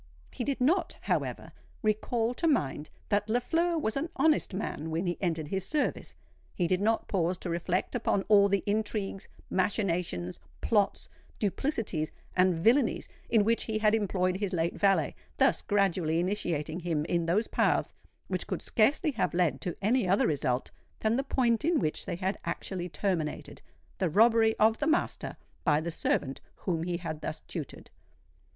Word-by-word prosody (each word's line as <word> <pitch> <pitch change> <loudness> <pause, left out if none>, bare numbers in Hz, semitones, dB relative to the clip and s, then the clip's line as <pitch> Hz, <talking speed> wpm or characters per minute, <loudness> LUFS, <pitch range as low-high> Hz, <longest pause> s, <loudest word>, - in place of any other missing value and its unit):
He - - -4
did 275 +2 -1
not, 335 +7 +1
however, - - -2 0.3
recall 225 +2 +1
to 330 - 0
mind 150 - 0 0.2
that 205 0 +1
Lafleur 330 +9 +1
was 220 -8 -1
an 300 +5 -1
honest 315 -1 +3
man 170 -5 -4
when 165 +3 -1
he 175 -1 0
entered 165 -5 -1
his 190 0 -1
service;—he 290 - -3
did 185 +2 +1
not 225 +2 +1
pause 180 -2 0
to 180 - -5
reflect 175 +2 -1
upon 215 -5 +1
all 200 -1 +5
the 200 0 +1
intrigues, 205 -2 -2 0.2
machinations, 175 - -1 0.2
plots, 205 -3 +1 0.3
duplicities, 205 - -1 0.2
and 185 -1 +4
villanies, 230 +9 +2 0.2
in 220 -3 +4
which 230 +2 +1
he 220 -1 -1
had 215 0 +3
employed 185 -4 +1
his 200 -1 -2
late 170 -1 0
valet,—thus 195 -1 +1
gradually 185 -5 +1
initiating 175 -4 -1
him 165 -4 -1
in 170 0 0
those 200 +7 +2
paths - - +1 0.3
which - - -2
could - - -3
scarcely 280 +7 +2
have 225 - -1
led 165 -7 +1
to 175 - -4
any 225 0 +2
other 195 +3 +3
result 130 -4 0 0.3
than 220 +1 +2
the 270 - 0
point 245 -3 +1
in 330 +1 +3
which 155 -3 -2
they - - -2
had 190 +3 -2
actually 175 +1 -4
terminated—the 170 +1 -3
robbery 225 +4 +5
of 220 +1 +4
the 295 - 0
master 320 +1 0 0.3
by 150 -3 +3
the 170 +2 -3
servant 135 -4 -1
whom 170 -4 -2
he 175 +1 -2
had 160 -3 -5
thus - - -4
tutored. - - -8
195 Hz, 160 wpm, -29 LUFS, 170-225 Hz, 0.3 s, all